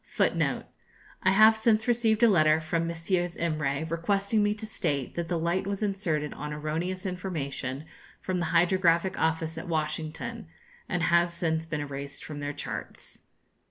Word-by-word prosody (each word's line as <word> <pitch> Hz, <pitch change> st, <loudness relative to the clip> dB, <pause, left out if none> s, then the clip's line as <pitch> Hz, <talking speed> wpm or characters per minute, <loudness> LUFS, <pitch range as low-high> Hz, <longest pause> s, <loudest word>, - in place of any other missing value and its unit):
[Footnote -, -, +1 dB
2: -, -, -26 dB, 0.6 s
I -, -, +7 dB
have 215 Hz, +3 st, +7 dB
since 220 Hz, 0 st, +2 dB
received 230 Hz, -2 st, +2 dB
a -, -, +9 dB
letter 155 Hz, -6 st, +5 dB
from 165 Hz, +1 st, -1 dB
Messrs. 175 Hz, +1 st, -1 dB
Imray 155 Hz, -2 st, -1 dB
requesting 195 Hz, +6 st, +1 dB
me 205 Hz, 0 st, +2 dB
to 215 Hz, +1 st, -6 dB
state 140 Hz, -, -2 dB
that 170 Hz, -1 st, -3 dB
the 175 Hz, -, 0 dB
light 170 Hz, +4 st, 0 dB
was 200 Hz, +1 st, -2 dB
inserted 170 Hz, -7 st, -1 dB
on 150 Hz, -, -6 dB
erroneous 160 Hz, +5 st, -3 dB
information 155 Hz, -7 st, -4 dB, 0.3 s
from 185 Hz, -1 st, -2 dB
the 170 Hz, -, 0 dB
hydrographic 175 Hz, +1 st, +3 dB
office 160 Hz, 0 st, 0 dB
at 160 Hz, -, -8 dB
Washington, 160 Hz, +7 st, -3 dB, 0.4 s
and 180 Hz, -4 st, 0 dB
has 170 Hz, 0 st, +3 dB
since 160 Hz, -1 st, -1 dB
been 155 Hz, -2 st, -2 dB
erased 140 Hz, -1 st, -6 dB
from 150 Hz, -2 st, -7 dB
their 145 Hz, 0 st, -3 dB
charts. 145 Hz, -, -7 dB
170 Hz, 160 wpm, -28 LUFS, 155-190 Hz, 0.6 s, a